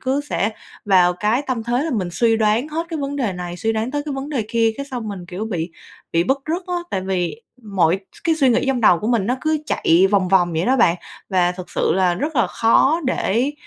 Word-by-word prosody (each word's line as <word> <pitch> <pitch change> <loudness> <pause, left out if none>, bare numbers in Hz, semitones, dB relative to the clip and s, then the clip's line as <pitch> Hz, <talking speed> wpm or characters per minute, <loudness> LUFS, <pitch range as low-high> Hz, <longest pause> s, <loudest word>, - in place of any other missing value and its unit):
cứ 265 +2 0
sẽ 205 - 0 0.3
vào 180 -3 +4
cái 215 +8 0
tâm 255 -5 -3
thế 240 +3 0
là 325 - -2
mình 200 -9 -1
suy 225 +1 +2
đoán 220 +6 +1
hết 330 +2 -3
cái 325 -2 -4
vấn 280 0 -3
đề 240 -8 -1
này 180 -1 -6
suy 225 +5 -1
đoán 220 +2 -2
tới 290 +1 -2
cái 290 - -4
vấn 270 +1 -5
đề 265 -7 -2
kia, 230 -1 +2
cái 280 - -5
xong 245 -5 -5
mình, 190 -4 -7
kiểu, 185 +5 -5
bị 175 -5 -3 0.4
bị 165 +1 +2
bứt 265 +6 +1
rứt 335 +4 -2
á. 360 - -3 0.2
Tại 190 - -1
vì 180 -5 -2 0.2
mọi 190 -4 +1
s - - -16
cái 330 - +3
suy 280 -5 +3
nghĩ 240 - +2
trong 265 -2 +1
đầu 180 -6 +5
của 215 - -4
mình 230 -5 +1
nó 250 - +1
cứ 310 0 0
chạy 175 +4 +3
vòng 195 -3 +2
vòng 180 -2 +3
vậy 160 +2 0
đó 260 +2 +3
bạn, 175 -8 +4 0.3
và 180 -2 +2
thực 180 0 -9
sự - - +1
là 185 -2 +2
rất 295 - -3
là 235 - +3
khó 270 +8 +3
để 255 +2 0
225 Hz, 255 wpm, -20 LUFS, 185-270 Hz, 0.4 s, đầu